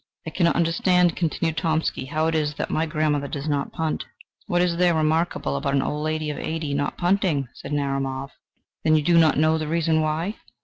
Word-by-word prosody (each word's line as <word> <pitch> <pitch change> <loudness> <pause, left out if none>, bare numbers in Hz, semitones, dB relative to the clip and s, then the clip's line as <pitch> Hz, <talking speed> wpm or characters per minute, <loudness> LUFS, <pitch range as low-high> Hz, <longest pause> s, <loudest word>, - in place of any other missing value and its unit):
"I 160 - -5
cannot 170 0 +2
understand," 170 +1 +2
continued 165 -1 -1
Tomsky, 160 -4 0
"how 155 +3 0
it 165 - +1
is 150 -2 0
that - - -3
my 160 +1 0
grandmother 150 -2 0
does 140 +2 -5
not 145 -2 -1
punt." 160 -1 -2 0.4
"What 175 0 +2
is 170 -1 0
there 175 -1 +3
remarkable 155 - 0
about 140 - -1
an 135 - +2
old 150 0 -2
lady 155 -1 -1
of 145 - -6
eighty 160 -3 -3
not 145 0 -2
punting?" 175 -7 +1
said - - -9
Narumov. 135 -1 -2 0.5
"Then 155 -1 +4
you 155 - +2
do 170 +2 +4
not 160 -4 +4
know 155 +1 +3
the 155 - -3
reason 160 0 +1
why?" 160 +7 -1
155 Hz, 205 wpm, -24 LUFS, 145-165 Hz, 0.5 s, Then